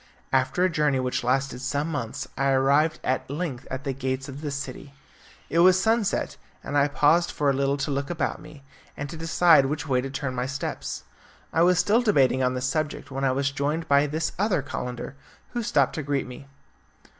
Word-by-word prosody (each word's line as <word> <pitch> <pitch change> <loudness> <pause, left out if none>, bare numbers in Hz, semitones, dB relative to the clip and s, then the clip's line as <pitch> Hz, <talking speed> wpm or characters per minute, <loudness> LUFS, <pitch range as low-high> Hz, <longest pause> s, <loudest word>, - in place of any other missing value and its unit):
After 130 +7 +2
a - - +5
journey 150 -5 +1
which 125 -1 -1
lasted 130 +1 0
some 145 +4 -1
months 130 -1 -4
I 140 0 +1
arrived 140 +4 +3
at 130 - -1
length 140 -4 -4
at 130 +1 -5
the 135 - -2
gates 130 0 -3
of 140 +1 -8
this 145 -2 -3
city. 140 +1 -7 0.5
It 165 - 0
was 185 +1 +6
sunset, 220 0 0 0.3
and 145 - -5
I 145 0 +4
paused 160 +4 +3
for 145 -2 +1
a - - 0
little 140 +1 +1
to 140 +1 -2
look 140 0 -2
about 175 - -2
me, 155 -2 -13 0.3
and 140 - -4
to - - -7
decide 165 -2 +4
which 150 +2 -3
way 130 -2 +2
to 135 - -5
turn 135 -1 -3
my 125 0 -2
steps. 135 +1 -4 0.5
I 165 - +3
was 180 +1 +5
still 205 +7 +3
debating 135 - +3
on 130 0 +1
this 125 0 -2
subject 145 0 -2
when 135 +1 -3
I 135 - +3
was 140 +1 0
joined 150 +4 -2
by 140 0 +4
this 155 +2 -2
other 195 -8 +1
calender, 125 -1 -5 0.4
who 240 - -2
stopped 145 - +2
to 155 - -3
greet 140 -1 -1
me. 125 +2 -10
140 Hz, 205 wpm, -25 LUFS, 135-160 Hz, 0.5 s, was